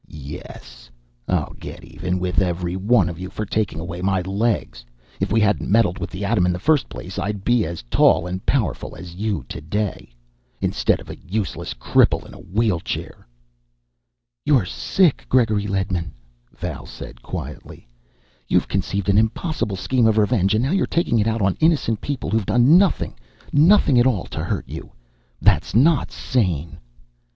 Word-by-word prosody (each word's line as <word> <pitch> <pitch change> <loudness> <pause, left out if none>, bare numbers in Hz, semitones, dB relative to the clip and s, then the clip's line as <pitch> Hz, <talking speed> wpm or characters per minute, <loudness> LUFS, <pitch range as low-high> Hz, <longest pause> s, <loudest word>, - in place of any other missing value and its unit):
"Yes! 70 -4 -10 0.4
I'll 90 -5 -1
get - - -9
even 90 +1 -3
with 90 -1 0
every 90 -1 -1
one 100 -1 +3
of 85 -1 -6
you 95 0 -5
for 110 - -4
taking 105 -5 -1
away 85 +1 -5
my 95 0 +1
legs! 100 - -1 0.4
If - - -1
we 110 - +3
hadn't 105 -1 +1
meddled 100 -3 +3
with 90 - -4
the 95 +2 -5
atom 100 -3 +2
in - - +2
the 90 - -2
first 150 - +2
place, 95 +1 -7
I'd 105 -1 -3
be 120 -5 +2
as 85 -4 -6
tall - - +3
and 90 +1 -4
powerful 130 -8 -1
as 85 +1 -9
you, 100 - -2
today 95 - -4 0.5
instead - - +1
of - - -10
a - - -10
useless 100 0 -4
cripple - - +2
in - - -12
a - - -12
wheelchair." 95 - -2 1.2
"You're 135 -10 +3
sick, 170 - +1
Gregory 110 -5 +2
Ledman," 95 -4 -2 0.4
Val - - -6
said - - -10
quietly. - - -8 0.6
"You've - - +2
conceived 100 -1 -2
an 100 +1 +5
impossible 110 - -1
scheme 115 +5 +2
of 110 -1 +2
revenge 105 -2 +3
and 110 - +2
now 135 - 0
you're 195 - +1
taking 165 -9 +1
it 105 - +1
out 110 -2 0
on 95 -1 +2
innocent 145 -9 +2
people 145 -3 -3
who've 110 -1 +1
done 125 +6 +5
nothing, 190 +1 +3 0.4
nothing 150 -4 +5
at 120 - +5
all 110 -9 +1
to - - -3
you. - - -9 0.5
That's - - +2
not 145 +6 +4
sane!" 90 - -1
100 Hz, 165 wpm, -22 LUFS, 90-120 Hz, 1.2 s, an